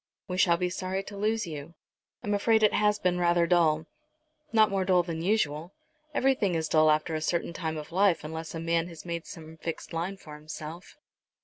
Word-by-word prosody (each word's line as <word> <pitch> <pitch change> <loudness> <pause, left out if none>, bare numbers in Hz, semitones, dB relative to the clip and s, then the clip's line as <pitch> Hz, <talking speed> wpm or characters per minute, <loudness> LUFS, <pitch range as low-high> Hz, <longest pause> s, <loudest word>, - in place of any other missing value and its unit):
"We 180 -1 -3
shall 170 -2 +5
be 180 0 -1
sorry 185 +1 -3
to 205 - -9
lose 215 +1 0
you. 155 0 -8 0.5
I'm 205 - -1
afraid 220 +2 +3
it 210 - +5
has 210 0 +3
been 180 -2 0
rather 175 -1 +3
dull." 165 -3 +3 0.7
"Not 220 -2 +5
more 195 -1 +1
dull 185 -1 +3
than 165 -2 -4
usual. 170 -4 0 0.4
Everything 260 - +2
is 160 -1 0
dull 155 0 +4
after 155 +1 +2
a 155 - -1
certain 170 +1 -1
time 160 -2 -3
of 150 +1 -7
life 190 -1 +3
unless 160 +2 -6
a - - -3
man 165 0 0
has 170 -1 -11
made 170 -1 -4
some 160 -1 -10
fixed 165 +1 -6
line 175 +4 -2
for 155 -5 -12
himself. 155 +3 -9
170 Hz, 200 wpm, -28 LUFS, 160-195 Hz, 0.7 s, shall